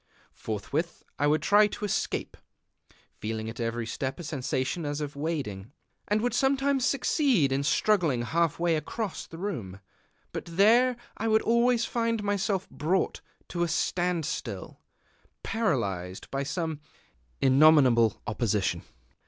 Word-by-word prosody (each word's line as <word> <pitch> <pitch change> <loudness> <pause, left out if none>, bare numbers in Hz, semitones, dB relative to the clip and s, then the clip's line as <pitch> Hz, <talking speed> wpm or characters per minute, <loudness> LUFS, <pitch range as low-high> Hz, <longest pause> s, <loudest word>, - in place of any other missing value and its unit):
Forthwith 140 - -4 0.2
I 145 - +3
would 155 +1 +2
try 205 +1 +5
to 210 - -5
escape, 205 - -2 0.8
(feeling 110 0 -3
at 115 - -12
every 115 0 -2
step 130 +5 -4
a - - -6
sensation 135 +1 -2
as 145 0 -2
of 145 -1 -5
wading), 140 -10 -4 0.4
and 210 +1 +1
would 245 - 0
sometimes 270 0 +2
succeed 255 - +2
in 135 +1 +1
struggling 155 - +2
half 165 +4 +1
way 170 -1 +2
across 205 +7 -4
the 165 - -10
room; 120 - -5 0.5
but - - -5
there 230 +8 +4 0.2
I 225 - -2
would 220 0 +3
always 235 0 +3
find 230 -2 -1
myself 200 -1 0
brought 180 +5 0 0.3
to 175 - -3
a 175 - +2
standstill, 160 - -2 0.6
paralyzed 100 - -2
by 135 - -1
some 155 +2 -3 0.6
innominable 135 -5 +5
opposition. 105 -6 0
160 Hz, 130 wpm, -28 LUFS, 130-205 Hz, 0.8 s, try